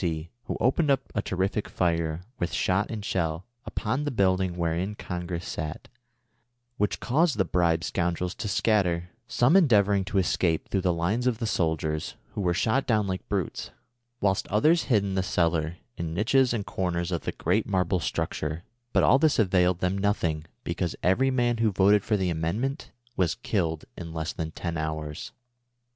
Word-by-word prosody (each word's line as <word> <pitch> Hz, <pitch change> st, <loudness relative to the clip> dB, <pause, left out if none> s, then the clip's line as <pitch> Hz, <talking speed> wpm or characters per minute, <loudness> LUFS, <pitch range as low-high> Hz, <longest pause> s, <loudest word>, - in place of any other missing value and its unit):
C, 80 Hz, -1 st, -2 dB
who -, -, -3 dB
opened 140 Hz, +5 st, +2 dB
a 135 Hz, -6 st, 0 dB
terrific 95 Hz, +2 st, -1 dB
fire, 85 Hz, -2 st, 0 dB, 0.2 s
with 90 Hz, -, -1 dB
shot 95 Hz, +3 st, +1 dB
and 105 Hz, -3 st, -5 dB
shell, 85 Hz, -2 st, -1 dB, 0.2 s
upon 130 Hz, +7 st, -1 dB
the 145 Hz, -, -1 dB
building 95 Hz, -6 st, +1 dB
wherein 85 Hz, +4 st, -1 dB
Con 90 Hz, -3 st, -5 dB
gress 85 Hz, -1 st, -4 dB
sat, 75 Hz, 0 st, -5 dB, 0.9 s
which 105 Hz, -, 0 dB
caused 150 Hz, +1 st, +2 dB
the 95 Hz, -, +2 dB
bribed 85 Hz, -2 st, +1 dB
scoundrels 90 Hz, +1 st, -1 dB
to 110 Hz, -, -5 dB
scatter, 90 Hz, -4 st, +1 dB, 0.2 s
some 125 Hz, +8 st, +3 dB
endeavoring 105 Hz, -, +4 dB
to 95 Hz, -, -2 dB
escape 90 Hz, -3 st, +1 dB
through 95 Hz, -, 0 dB
the 90 Hz, -1 st, +2 dB
lines 95 Hz, +9 st, 0 dB
of 120 Hz, -3 st, +1 dB
the 115 Hz, -, -3 dB
sol 80 Hz, -7 st, +1 dB
diers, 75 Hz, 0 st, -3 dB, 0.2 s
who -, -, -3 dB
were 90 Hz, -2 st, +1 dB
shot 125 Hz, +9 st, +1 dB
down 110 Hz, -4 st, +2 dB
like 95 Hz, -1 st, -4 dB
brutes, 100 Hz, -4 st, -2 dB, 0.5 s
whilst 95 Hz, -1 st, +1 dB
others 155 Hz, -, +3 dB
hid 110 Hz, -6 st, +3 dB
in 100 Hz, -1 st, -2 dB
the 95 Hz, -, +1 dB
cellar, 85 Hz, -3 st, 0 dB, 0.2 s
in 85 Hz, -1 st, -3 dB
niches 125 Hz, +6 st, +3 dB
and 110 Hz, -4 st, -2 dB
corners 85 Hz, -1 st, -2 dB
of 85 Hz, -, -1 dB
tlie -, -, -5 dB
great 95 Hz, +6 st, +1 dB
marble 95 Hz, -2 st, +1 dB
■structure; 75 Hz, +1 st, -3 dB, 0.3 s
but -, -, +4 dB
all 130 Hz, -, +6 dB
tliis 155 Hz, 0 st, +3 dB
availed 90 Hz, -4 st, +3 dB
them 90 Hz, +1 st, +1 dB
nothing, 90 Hz, -6 st, 0 dB, 0.2 s
because 85 Hz, 0 st, -2 dB
every 125 Hz, +9 st, +3 dB
man 120 Hz, -2 st, +1 dB
who 110 Hz, -1 st, +2 dB
voted 100 Hz, +1 st, +4 dB
for 105 Hz, -, +1 dB
the 95 Hz, -2 st, 0 dB
Amendment 105 Hz, -, -2 dB, 0.3 s
was 85 Hz, -5 st, +1 dB
killed 80 Hz, -6 st, -1 dB
in 85 Hz, -2 st, -7 dB
less 80 Hz, 0 st, -2 dB
than 80 Hz, -1 st, -3 dB
ten 85 Hz, +1 st, -4 dB
hours. 80 Hz, -1 st, -4 dB
95 Hz, 180 wpm, -27 LUFS, 85-105 Hz, 0.9 s, all